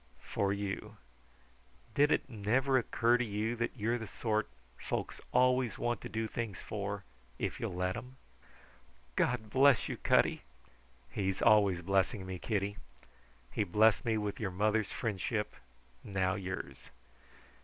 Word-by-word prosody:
"For 100 -1 0
you. 100 +1 -4 1.0
Did 145 +5 +4
it - - +2
never 125 +4 +1
occur 120 -1 +3
to - - +2
you 110 +1 -1
that 115 +3 -2
you're 115 +3 0
the 110 - -6
sort 110 +1 -1 0.3
folks - - -4
always 125 -3 +3
want 120 -3 -1
to - - -6
do 110 +2 -2
things 110 -5 -4
for 100 -1 -4 0.3
if - - -3
you'll - - -3
let 90 +1 0
them?" 125 +4 -8 1.0
"God 110 -3 0
bless 135 0 +5
you, - - -4
Cutty!" - - +3 0.7
"He's 95 -2 -1
always 100 -5 +4
blessing 95 +2 +1
me, 95 -1 -5
Kitty. 100 -1 -1 0.7
He - - +1
blessed 105 +3 +4
me 115 -2 +1
with 105 -1 -3
your 110 - -1
mother's 105 +3 +1
friendship, 105 -5 -2 0.5
now 95 -2 0
yours. 95 -1 -6
105 Hz, 140 wpm, -33 LUFS, 100-120 Hz, 1.0 s, bless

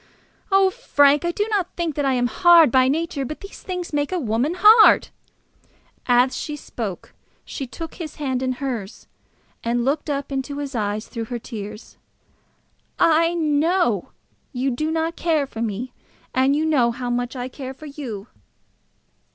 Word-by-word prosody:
Oh, 385 -1 +5
Frank, 290 - +3
I - - +1
do 415 +4 -1
not 385 -4 -1
think 340 -3 -2
that 290 0 -1
I 270 - +2
am 245 -1 +1
hard 335 +2 +6
by 260 +1 +4
nature, 300 0 -1
but 305 +4 -6
these 395 - -11
things 360 -4 -5
make 290 +1 0
a 370 - 0
woman 255 +3 0
hard." 430 +3 +7 1.0
As 245 +1 +4
she 300 - -4
spoke 220 -9 -7 0.3
she 270 - -6
took 325 +6 -8
his 315 -4 -7
hand 260 -4 -2
in 255 -1 0
hers, 245 -6 -5 0.6
and 235 +1 0
looked 295 +3 -1
up 280 0 -3
into 275 +1 -3
his 285 -1 -5
eyes 210 -2 -2
through 230 -2 -5
her 240 +2 -4
tears. 215 -2 -9 1.0
"I 330 +1 +3
know 305 - +1 0.5
that 255 - -10
you 265 +1 +1
do 310 +6 -2
not 325 +1 -1
care 315 -4 +1
for 230 -4 -8
me, 230 +3 -3 0.4
and 265 +2 +3
you 310 +2 0
know 275 -7 +3
how 245 +1 -4
much 245 +1 -2
I 250 0 -4
care 260 0 -8
for 310 - -12
you." 260 -9 -7
275 Hz, 170 wpm, -22 LUFS, 245-320 Hz, 1.0 s, hard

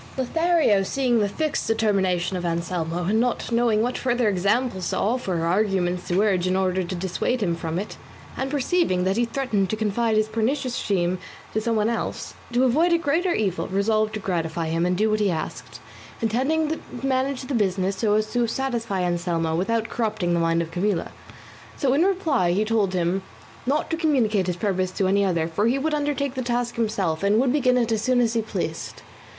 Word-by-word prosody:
Lothario 320 - +2
seeing 245 +3 +1
the 205 -1 +1
fixed 310 +8 -2
determination 195 -5 +1
of 180 - -3
Anselmo, 170 0 -2
and 215 +5 +2
not 245 0 -1
knowing 230 -2 +2
what 245 +1 -2
further 245 -2 +1
examples 200 0 0
to - - -1
offer 200 -6 0
or - - 0
arguments 180 -1 0
to 180 0 +1
urge 185 -4 +1
in 185 - +1
order 185 -1 +1
to 180 +2 -4
dissuade 190 +6 -1
him 170 -3 0
from 165 0 -4
it, 200 +3 -5 0.4
and 265 - -2
perceiving 285 - +1
that 190 +1 +1
he 240 +2 +2
threatened 230 -7 -1
to 220 - 0
confide 220 +1 0
his 215 0 +2
pernicious 240 +4 -1
scheme 185 -3 0 0.3
to 220 - 0
some 230 0 0
one 215 0 +2
else, 230 0 -3 0.2
to 245 +2 +2
avoid 305 +8 +3
a 340 - +5
greater 335 +3 +1
evil 195 -4 -1
resolved 215 +2 +1
to - - -3
gratify 165 -4 -2
him 165 +2 +1
and 180 0 0
do 215 +3 +2
what 215 0 +1
he 205 -2 +2
asked, 125 -8 -5 0.4
intending 270 +8 +1
to 320 - -2 0.3
manage 265 0 0
the 270 - -5
business 195 -3 0
so 210 +1 +2
as 215 0 -1
to 240 -1 +2
satisfy 230 -6 -2
Anselmo 170 -2 0
without 225 +6 0
corrupting 215 -6 -1
the 170 - +2
mind 165 0 +2
of 165 - -9
Camilla; 180 0 -1 0.7
so 265 -3 +2
in 285 - +3
reply 320 - +1
he 210 +4 +1
told 210 -4 +1
him 180 +2 0 0.5
not 295 +5 0
to 325 - 0
communicate 235 - +1
his 180 - -1
purpose 185 -1 0
to 195 - 0
any 200 +1 +3
other, 170 -4 +1
for 185 +7 0
he 250 +3 +2
would 305 +3 -1
undertake 290 -2 -1
the 260 - -3
task 240 -1 -1
himself, 200 -8 -1
and 200 +2 +3
would 255 0 +2
begin 255 -4 +3
it 235 -2 +1
as 220 -1 +1
soon 255 +2 +2
as 230 -2 +2
he 230 - +1
pleased. 220 - -5
215 Hz, 205 wpm, -24 LUFS, 185-250 Hz, 0.7 s, a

